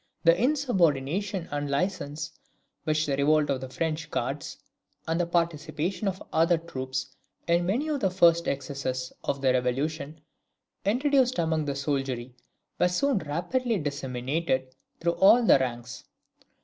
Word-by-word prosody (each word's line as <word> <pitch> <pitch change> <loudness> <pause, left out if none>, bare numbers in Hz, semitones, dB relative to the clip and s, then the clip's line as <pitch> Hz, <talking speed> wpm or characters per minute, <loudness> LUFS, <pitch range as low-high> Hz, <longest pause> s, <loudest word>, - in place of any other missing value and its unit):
The 165 0 +6
insubordination 190 - +1
and 145 0 -2
licence, 150 -1 -2 0.5
which 155 0 +1
the 140 - 0
revolt 150 +1 +3
of 130 -2 -1
the 130 - -6
French 155 +2 -2
guards, 135 +2 -3 0.5
and 165 +1 0
the 175 - +1
participation 170 +2 -1
of 190 -1 -3
other 165 +2 +4
troops 130 -5 -5 0.3
in 170 +1 +2
many 250 +11 0
of 300 -2 -1
the 195 - +2
first 170 -2 +4
excesses 130 -2 -3
of 140 - -2
the 130 -2 +3
Revolution 140 +5 -1 0.7
introduced 260 +3 +2
among 160 -2 +1
the 140 -1 -2
soldiery, 135 -3 -2 0.5
were - - +5
soon 260 +6 +1
rapidly 185 - -1
disseminated 135 -1 -2 0.3
through 170 0 +1
all 235 +5 +7
the 140 - +6
ranks. 120 -1 -4
155 Hz, 135 wpm, -27 LUFS, 140-180 Hz, 0.7 s, all